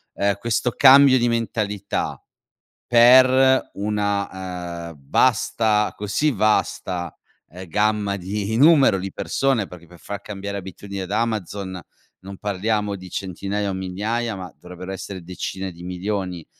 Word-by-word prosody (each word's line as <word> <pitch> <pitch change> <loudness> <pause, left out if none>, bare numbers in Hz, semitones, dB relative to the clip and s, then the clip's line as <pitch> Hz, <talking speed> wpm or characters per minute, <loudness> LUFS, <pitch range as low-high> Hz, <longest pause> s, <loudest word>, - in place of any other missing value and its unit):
ehm, 100 -1 +1
questo 115 +3 -1
cambio 135 -1 +7
di 120 0 +2
mentalità, 110 -3 -2 0.7
per 130 +2 +6
una, 95 -4 -3
ehm, 85 - -11 0.2
vasta 110 -3 +2
così 105 +9 0
vasta, 95 - 0 0.4
ehm, 90 +2 -10
gamma 105 +1 0
di 100 +3 -3
numero 140 -7 +6
di 95 0 -5
persone 135 -7 0
perché 85 -1 -13
per 90 0 -16
far 100 +5 -7
cambiare 100 0 -6
abitudine 100 +1 -7
ad 95 - -7
Amazon, 100 -4 -2 0.4
non 95 0 -10
parliamo 105 +1 -1
di 90 -1 -11
centinaia 100 +2 -3
o - - -1
migliaia, 105 +4 -3
ma 90 -1 -7
dovrebbero 90 +1 -9
essere 95 -1 -7
decine 95 +2 -5
di 85 +1 -13
milioni. 90 -1 -4
100 Hz, 130 wpm, -22 LUFS, 95-110 Hz, 0.7 s, cambio